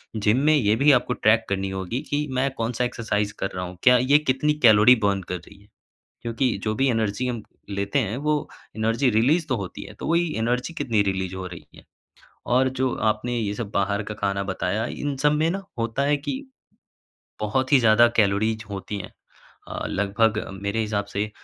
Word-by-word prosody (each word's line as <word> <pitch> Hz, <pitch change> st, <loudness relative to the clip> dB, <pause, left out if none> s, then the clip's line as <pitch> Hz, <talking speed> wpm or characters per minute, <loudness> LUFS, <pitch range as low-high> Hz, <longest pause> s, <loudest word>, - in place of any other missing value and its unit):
Gym 110 Hz, +2 st, +2 dB
में 155 Hz, 0 st, +5 dB
ये 110 Hz, -7 st, +3 dB
भी 140 Hz, +6 st, +5 dB
आपको 125 Hz, -2 st, +2 dB
ट्रैक 110 Hz, -1 st, +3 dB
करनी 95 Hz, 0 st, -1 dB
होगी 95 Hz, +6 st, -3 dB
कि 150 Hz, +1 st, -1 dB
मैं 130 Hz, +2 st, +1 dB
कौन-सा 115 Hz, +2 st, -1 dB
एक्सरसाइज़ 105 Hz, -4 st, -2 dB
कर 95 Hz, -, -1 dB
रहा 90 Hz, -, -3 dB
हूँ। 90 Hz, 0 st, -9 dB
क्या 125 Hz, -1 st, +7 dB
ये 130 Hz, +4 st, +4 dB
कितनी 150 Hz, +1 st, +1 dB
कैलोरी 110 Hz, +2 st, +7 dB
बर्न 100 Hz, -1 st, +1 dB
कर 90 Hz, -, -2 dB
रही 95 Hz, +4 st, -16 dB
है? 100 Hz, -, -22 dB, 0.6 s
क्योंकि 120 Hz, +1 st, 0 dB
जो 110 Hz, 0 st, 0 dB
भी 135 Hz, +5 st, +1 dB
एनर्जी 110 Hz, +1 st, -1 dB
हम 120 Hz, -3 st, -3 dB, 0.3 s
लेते 100 Hz, +5 st, -1 dB
हैं, 110 Hz, -3 st, -1 dB
वो 150 Hz, +1 st, -1 dB, 0.3 s
एनर्जी 115 Hz, +4 st, +1 dB
रिलीज़ 135 Hz, +10 st, +2 dB
तो 130 Hz, -, +1 dB
होती 100 Hz, -4 st, -6 dB
है। -, -, -11 dB
तो -, -, -7 dB
वही 170 Hz, -1 st, +1 dB
एनर्जी 125 Hz, +8 st, -1 dB
कितनी 110 Hz, -8 st, +1 dB
रिलीज़ 95 Hz, -2 st, -2 dB
हो 95 Hz, -, -5 dB
रही 90 Hz, -2 st, -10 dB
है। -, -, -15 dB, 0.6 s
और 130 Hz, +2 st, +3 dB
जो 130 Hz, -1 st, +1 dB, 0.2 s
आपने 120 Hz, +3 st, -3 dB
ये 105 Hz, -3 st, -2 dB
सब 105 Hz, -1 st, -5 dB
बाहर 100 Hz, +1 st, 0 dB
का 105 Hz, -, -5 dB
खाना 100 Hz, -1 st, -1 dB
बताया, 100 Hz, +2 st, -2 dB
इन 145 Hz, +2 st, -4 dB
सब 145 Hz, +2 st, +3 dB
में 155 Hz, +2 st, +1 dB
ना 195 Hz, +2 st, -3 dB, 0.2 s
होता 115 Hz, +3 st, -1 dB
है 145 Hz, +1 st, +2 dB
कि 145 Hz, -, -4 dB, 1.1 s
बहुत 130 Hz, +6 st, -1 dB
ही 140 Hz, -, +8 dB
ज़्यादा 115 Hz, +1 st, +6 dB
कैलोरीज़ 110 Hz, +1 st, +1 dB
होती 100 Hz, +1 st, -5 dB
हैं। -, -, -8 dB, 0.6 s
अ, -, -, -4 dB
लगभग 105 Hz, +2 st, +1 dB, 0.2 s
मेरे 100 Hz, +3 st, -1 dB
हिसाब 105 Hz, -2 st, -1 dB
से 105 Hz, +2 st, -1 dB
115 Hz, 200 wpm, -24 LUFS, 100-130 Hz, 1.1 s, ही